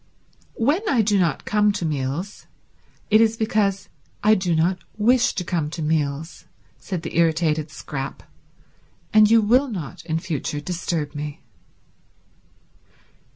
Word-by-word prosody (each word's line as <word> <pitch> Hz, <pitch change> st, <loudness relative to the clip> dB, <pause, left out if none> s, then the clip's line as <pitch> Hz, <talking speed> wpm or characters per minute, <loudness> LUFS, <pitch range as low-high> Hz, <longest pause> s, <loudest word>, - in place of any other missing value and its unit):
"When 285 Hz, -, +1 dB
I 240 Hz, -5 st, +3 dB
do 205 Hz, -1 st, +2 dB
not 170 Hz, -3 st, 0 dB
come 210 Hz, 0 st, +3 dB
to 185 Hz, -, -3 dB
meals 150 Hz, +5 st, -3 dB, 0.6 s
it 215 Hz, +1 st, +6 dB
is 225 Hz, 0 st, +2 dB
because 215 Hz, -4 st, 0 dB, 0.4 s
I 215 Hz, +1 st, +6 dB
do 185 Hz, -4 st, +1 dB
not 175 Hz, +3 st, +1 dB, 0.2 s
wish 245 Hz, +4 st, +3 dB
to 180 Hz, -, -2 dB
come 165 Hz, -4 st, -1 dB
to 160 Hz, 0 st, -5 dB
meals," 150 Hz, 0 st, -2 dB, 0.3 s
said 180 Hz, -4 st, -5 dB
the 165 Hz, -, -6 dB
irritated 160 Hz, -2 st, +1 dB
Scrap, 135 Hz, -2 st, -6 dB, 0.9 s
"and 215 Hz, -1 st, +7 dB
you 225 Hz, -1 st, +5 dB
will 250 Hz, +7 st, +4 dB
not 175 Hz, -, -6 dB
in 160 Hz, -1 st, -1 dB
future 155 Hz, -3 st, -3 dB
disturb 165 Hz, -2 st, -3 dB
me." 145 Hz, -1 st, -6 dB
175 Hz, 135 wpm, -23 LUFS, 155-215 Hz, 0.9 s, and